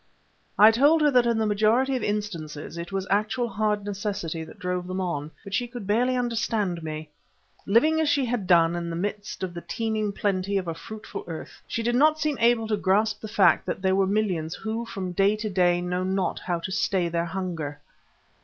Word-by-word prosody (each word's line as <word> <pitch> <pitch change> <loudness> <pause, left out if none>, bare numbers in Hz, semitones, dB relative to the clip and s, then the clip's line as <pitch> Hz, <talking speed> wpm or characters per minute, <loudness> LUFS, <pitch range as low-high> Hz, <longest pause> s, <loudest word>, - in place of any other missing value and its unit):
I 215 +2 +9
told 290 +7 +4
her 295 - +5
that 250 -2 +4
in 235 -1 +2
the 220 - +1
majority 220 +6 +2
of 255 - -2
instances 170 -9 -4
it 170 +2 -6
was 195 -1 -2
actual 215 +4 +1
hard 210 -2 -1
necessity 195 -5 -3
that 160 - -12
drove 180 0 -3
them 185 +1 -3
on, 155 -5 -2
but 200 - -9
she 245 +3 0
could 240 -3 -8
barely 240 +5 +2
understand 225 -7 -1
me. 155 -1 -6 0.6
Living 310 +10 +4
as 310 - +2
she 280 -3 +2
had 230 -6 -2
done, 170 -2 +5
in 170 -1 -3
the 165 - -4
midst 205 +2 -4
of 180 -2 -3
the 170 - -6
teeming 220 -1 -2
plenty 200 0 -1
of 185 -2 -2
a 165 - -1
fruitful 215 +6 -8
earth, 165 -2 -8
she 230 - -2
did 240 +1 +1
not 305 +5 +4
seem 305 -3 0
to - - -13
be 230 - +5
able 230 -2 +2
to 210 - +1
grasp 210 +2 +1
the 220 - -6
fact 205 -2 +3
that 190 - -3
there 190 0 +3
were 195 0 +2
millions 190 -6 0
who 225 +2 -4
from 185 -4 -4
day 195 +3 +3
to 215 0 -4
day 175 -2 +3
know 180 +1 -2
not 190 -1 -1
how 175 -1 -2
to 190 - -5
stay 190 -2 +1
their 170 0 -1
hunger. 165 -5 -4
200 Hz, 220 wpm, -26 LUFS, 180-225 Hz, 0.6 s, I